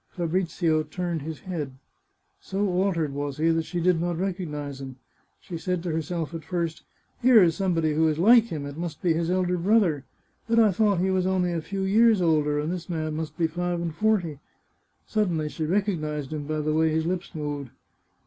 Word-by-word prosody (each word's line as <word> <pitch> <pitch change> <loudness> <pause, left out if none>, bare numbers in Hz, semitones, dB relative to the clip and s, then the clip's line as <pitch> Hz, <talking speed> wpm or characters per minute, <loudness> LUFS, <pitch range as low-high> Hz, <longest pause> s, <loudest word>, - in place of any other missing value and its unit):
Fabrizio 170 -2 0
turned 165 +1 -3
his 155 +1 -6
head. 150 -8 -5 0.6
So 200 +2 -2
altered 180 -5 0
was 145 -1 -3
he 160 +2 +2
that 165 0 0
she 175 - -3
did 170 -1 +2
not 175 -1 -1
recognise 150 -7 -4
him. 130 -1 -7 0.4
She 170 -2 -7
said 180 0 -2
to 175 - -2
herself 160 +1 -3
at 165 -1 -6
first: 165 -1 -3 0.2
" - - -40
Here 235 -4 +7
is 165 -2 +3
somebody 165 -5 +1
who 160 +1 +3
is 155 -1 0
like 225 +6 +6
him. 155 -10 -5
It 140 +1 -7
must 170 -4 -5
be 170 -2 +3
his 165 +1 -1
elder 180 -1 +1
brother. 180 -7 +3 0.5
But 230 - +2
I 220 -3 +6
thought 200 -2 +2
he 190 +1 +1
was 185 -1 +1
only 180 -2 +1
a 165 - -1
few 195 +4 -4
years 220 +2 +4
older, 155 -4 +2
and 150 +3 -2
this 180 -1 -5
man 155 -2 -2
must 160 0 -5
be 170 - +2
five 175 +2 -2
and 170 -2 -3
forty." 175 -6 0 0.7
Suddenly 175 -8 0
she 155 +1 -3
recognised 155 -6 -1
him 145 -2 -4
by 155 0 -1
the 155 0 0
way 160 +1 +3
his 160 0 0
lips 180 +1 -3
moved. 145 -3 -4
170 Hz, 205 wpm, -26 LUFS, 155-185 Hz, 0.7 s, Here